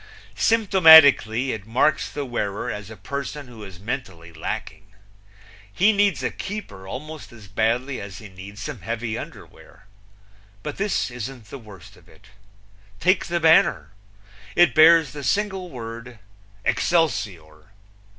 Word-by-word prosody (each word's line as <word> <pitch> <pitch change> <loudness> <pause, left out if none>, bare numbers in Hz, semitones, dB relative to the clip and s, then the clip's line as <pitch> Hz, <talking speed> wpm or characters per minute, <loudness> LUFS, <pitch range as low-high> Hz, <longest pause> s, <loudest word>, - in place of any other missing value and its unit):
Symptomatically 160 - +6
it 110 -1 -7
marks 140 +6 +1
the 145 - -5
wearer 105 -5 -3
as 105 0 -7
a 110 - -11
person 140 0 -6
who 115 -3 -12
is 95 -3 -11
mentally 95 -7 -6
lacking. 85 +4 -6 0.8
He 200 - +3
needs 205 -1 +1
a - - -1
keeper 195 - -8
almost 155 +8 -8
as 110 -4 -14
badly 115 +7 -1
as 100 -3 -9
he 110 - -10
needs 100 +3 -11
some 145 -9 -7
heavy 115 +3 -4
underwear. - - -11 0.8
But - - -6
this 195 -9 -1
isn't 120 -2 -8
the 140 - -8
worst 100 -3 -14
of 90 -1 -22
it. 80 - -20 0.7
Take 185 +2 +2
the 170 0 -1
banner. 160 - +3 0.6
It 175 - +5
bears 160 -2 +6
the 145 +2 -8
single 190 - -1
word 115 -1 -9 0.5
"Excelsior." 105 - -1
120 Hz, 135 wpm, -23 LUFS, 100-160 Hz, 0.8 s, Symptomatically